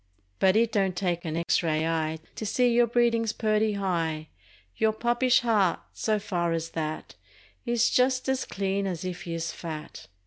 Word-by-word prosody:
But 190 0 +4
it 230 +1 +3
don't 195 -4 +1
take 175 -2 -1
an 160 0 -2
X 170 - +1
ray 160 -2 0
eye 160 -1 -1 0.2
To - - -4
see 240 +3 +2
your 240 0 +4
breedin's 230 -1 +2
purty 215 -1 +1
high— 165 -6 -2 0.5
lour 220 - +4
puppish 240 +3 +2
heart, 210 -7 +2
so 215 -1 0
far 175 -5 -1
as 165 0 -2
that, 155 -1 -4 0.5
Is 240 0 +2
just 255 +1 +2
as 265 0 0
clean 195 0 -1
as 180 -1 -4
if 180 +1 -5
you's 165 -1 -3
fat. 155 -2 -8
195 Hz, 170 wpm, -27 LUFS, 165-230 Hz, 0.5 s, But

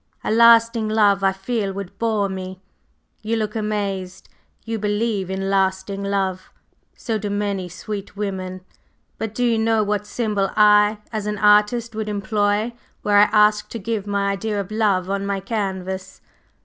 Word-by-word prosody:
A - - -1
lasting 230 -1 +5
love 205 -2 +3
I 195 - +4
feel 195 +1 -2
would 195 -2 -8
bore 220 -3 +1
me. 190 -1 -6 0.6
You 220 +2 -1
look 215 -1 -2
amazed; 200 -4 -3 0.4
you 225 -1 -3
believe 210 -2 -1
in 195 0 -2
lasting 190 0 0
love? 190 -2 -2 0.5
So 225 -2 -2
do 205 0 -4
many 200 -3 -2
sweet 200 +3 -7
women. 185 -2 -4 0.6
But 220 -1 -4
do 245 - +1
you 230 -2 +2
know 220 -1 +2
what 210 0 -2
symbol 210 -4 -1
I, 210 0 +5 0.2
as 215 -1 -3
an 210 0 -2
artist, 210 +3 +3
would 215 -1 -3
employ 205 +2 0 0.3
were 210 - -1
I 205 - +8
asked 210 0 +3
to - - -3
give 215 -1 -3
my 200 -1 0
idea 205 +1 -2
of 200 0 -5
Love 205 -4 +1
on 195 0 -2
my 200 0 -1
canvas?" 190 -2 -4
205 Hz, 160 wpm, -21 LUFS, 195-215 Hz, 0.6 s, I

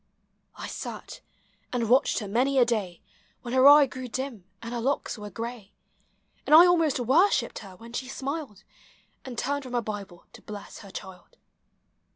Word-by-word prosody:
I - - -7
sat, - - -7 0.5
and 240 -2 -1
watched 255 +4 +3
her 210 - -3
many 255 +7 +1
a 250 - +6
day, 205 -7 -2 0.4
When 240 -1 -5
her 260 +1 +6
eye 290 0 +9
grew 260 -1 -7
dim, 245 -5 -5
and 230 +1 -7
her 240 - -3
locks 275 +4 -1
were 210 -2 -8
gray; 230 0 -7 0.7
And 305 - +7
1 340 +3 +10
almost 330 -6 +2
worshipped 295 - +2
her 195 -3 -11
when 230 +4 -13
she 255 +2 -4
smiled, 270 - -5 0.6
And 250 -3 -7
turned 285 +4 -1
from 255 -1 -9
her 240 -1 0
Hible 200 -5 -7
to - - -13
bless 205 -1 -9
her 200 - -12
child. 190 - -10
245 Hz, 175 wpm, -27 LUFS, 210-275 Hz, 0.7 s, 1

